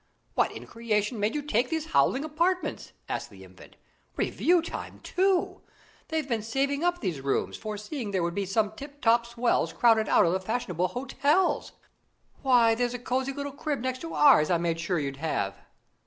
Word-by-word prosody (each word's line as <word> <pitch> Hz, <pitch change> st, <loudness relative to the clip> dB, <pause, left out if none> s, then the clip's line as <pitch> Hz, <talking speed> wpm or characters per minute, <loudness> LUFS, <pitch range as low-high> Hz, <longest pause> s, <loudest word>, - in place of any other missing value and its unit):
"What -, -, +2 dB
in -, -, -9 dB
creation 220 Hz, -1 st, -1 dB
made 210 Hz, +5 st, 0 dB
you 295 Hz, -, -2 dB
take 250 Hz, -3 st, +1 dB
these 320 Hz, 0 st, -3 dB
howling 270 Hz, -, +3 dB
apartments?" 340 Hz, +4 st, -1 dB, 0.2 s
asked -, -, -4 dB
the -, -, -14 dB
Infant. -, -, -16 dB, 0.4 s
"Review 350 Hz, -1 st, +2 dB
time, -, -, -7 dB
too! 375 Hz, -1 st, 0 dB, 0.5 s
They've 320 Hz, -3 st, -2 dB
been 230 Hz, -4 st, -1 dB
saving 275 Hz, +7 st, -1 dB
up 350 Hz, 0 st, +1 dB
these 175 Hz, -, -2 dB
rooms, 135 Hz, 0 st, -1 dB
foreseeing 215 Hz, +3 st, -5 dB
there 190 Hz, -3 st, 0 dB
would 170 Hz, 0 st, -1 dB
be 200 Hz, 0 st, -2 dB
some 210 Hz, +2 st, +1 dB
tip 285 Hz, +5 st, -11 dB
top 235 Hz, -1 st, +3 dB
swells 235 Hz, 0 st, 0 dB
crowded 225 Hz, -2 st, +3 dB
out -, -, +5 dB
of 170 Hz, -, +2 dB
the 190 Hz, -, +1 dB
fashionable 185 Hz, -4 st, -1 dB
hotels. 285 Hz, -, 0 dB, 0.7 s
Why, 245 Hz, -4 st, +5 dB
there's 245 Hz, +1 st, -1 dB
a -, -, -2 dB
cosy 255 Hz, +2 st, -1 dB
little 285 Hz, +1 st, -5 dB
crib 285 Hz, -1 st, -3 dB
next 255 Hz, 0 st, -2 dB
to 330 Hz, +2 st, -6 dB
ours 270 Hz, -, +6 dB
I 175 Hz, -, +3 dB
made 165 Hz, -1 st, -1 dB
sure 175 Hz, +2 st, -1 dB
you'd 140 Hz, -3 st, -3 dB
have." 120 Hz, -10 st, -2 dB
240 Hz, 185 wpm, -27 LUFS, 200-285 Hz, 0.7 s, ours